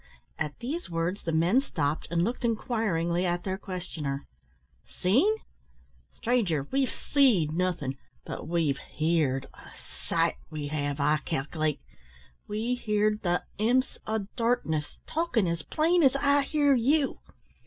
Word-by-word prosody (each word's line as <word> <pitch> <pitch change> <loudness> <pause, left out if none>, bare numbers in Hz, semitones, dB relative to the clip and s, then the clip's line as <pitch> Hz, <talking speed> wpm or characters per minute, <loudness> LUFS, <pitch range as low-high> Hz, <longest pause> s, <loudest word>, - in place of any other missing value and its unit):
At 150 -1 -2
these 280 - -4
words 170 +4 -1
the 165 - -2
men 170 +11 +4
stopped, 150 - -2
and 170 +1 +1
looked 235 +6 -2
inquiringly 210 -7 0
at 175 -1 0
their 190 0 -2
questioner. 160 -8 -4 0.6
"Seen! 255 - +2 0.8
stranger, 200 - 0
we've 270 -1 +2
seed 235 - +3
nothin', 160 -6 -1 0.3
but - - -6
we've 160 -5 +1
hear'd 155 -4 0
a - - -14 0.4
sight, - - +2
we 150 -2 -4
have, 145 -1 -2
I 150 +2 +3
calc'late. 155 0 -2 0.7
We 220 +4 -1
hear'd 210 -3 +1
the 175 -1 +1 0.2
imps 245 +4 +2
o' 215 -2 -1
darkness 230 -11 0
talkin' 315 - +1
as 170 -1 -1
plain 335 - +2
as 270 -3 +5
I 280 +1 +4
hear 285 0 +3
you. 270 +4 +2
185 Hz, 130 wpm, -28 LUFS, 155-245 Hz, 0.8 s, as